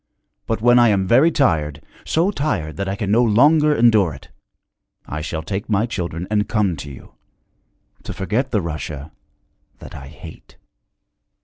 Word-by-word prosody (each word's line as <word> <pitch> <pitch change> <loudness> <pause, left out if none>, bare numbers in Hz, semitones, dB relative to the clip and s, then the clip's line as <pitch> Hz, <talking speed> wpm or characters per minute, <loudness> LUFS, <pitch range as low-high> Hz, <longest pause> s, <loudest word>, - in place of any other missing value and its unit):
But 115 -1 -2
when 120 0 +6
I 120 - +5
am 100 -3 +2
very 130 - +4
tired, 80 - 0 0.3
so 170 +5 +1
tired 110 - -3
that 100 0 -3
I 100 - -2
can 100 -2 -3
no 115 +3 +4
longer 150 +7 +4
endure 110 - +3
it, 65 - -15 0.8
I 75 +2 -5
shall 80 0 -4
take 100 +5 -5
my 105 +1 +1
children 90 -6 -4
and 105 -1 0
come 100 -5 +1
to 75 - -8
you 65 - -14 0.9
to - - -8
forget 110 +8 -2
the 105 - 0
Russia 75 -2 -6 0.7
that - - -12
I - - -9
hate.' - - -13
105 Hz, 165 wpm, -20 LUFS, 80-120 Hz, 0.9 s, when